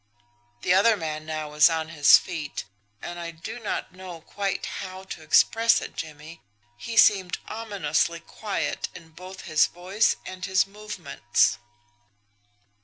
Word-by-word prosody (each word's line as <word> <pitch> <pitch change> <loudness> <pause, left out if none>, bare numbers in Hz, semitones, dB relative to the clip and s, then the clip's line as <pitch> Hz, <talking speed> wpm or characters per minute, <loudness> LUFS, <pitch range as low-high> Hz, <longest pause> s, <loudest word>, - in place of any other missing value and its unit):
"The 180 - +3
other 215 +4 +5
man 155 -2 -5
now 155 -1 -4
was 150 +2 +6
on 160 -1 -2
his 145 -4 +7
feet 160 -6 -5 0.4
and, 175 0 -6
I 170 -1 -5
do 170 +9 -8
not 220 - -4
know 185 -2 -9
quite 195 +3 -3
how 185 0 -7
to 190 - -8
express 230 0 +4
it, - - -8
Jimmie, 155 +2 -8 0.3
he 230 - -6
seemed 190 -5 +5
ominously 175 -7 -1
quiet 205 +3 -4
in 165 -2 -12
both 185 +4 -11
his 155 0 +3
voice 190 +5 +1
and 185 -1 -8
his 190 0 +2
movements. 195 -11 -1
180 Hz, 140 wpm, -25 LUFS, 160-195 Hz, 0.4 s, his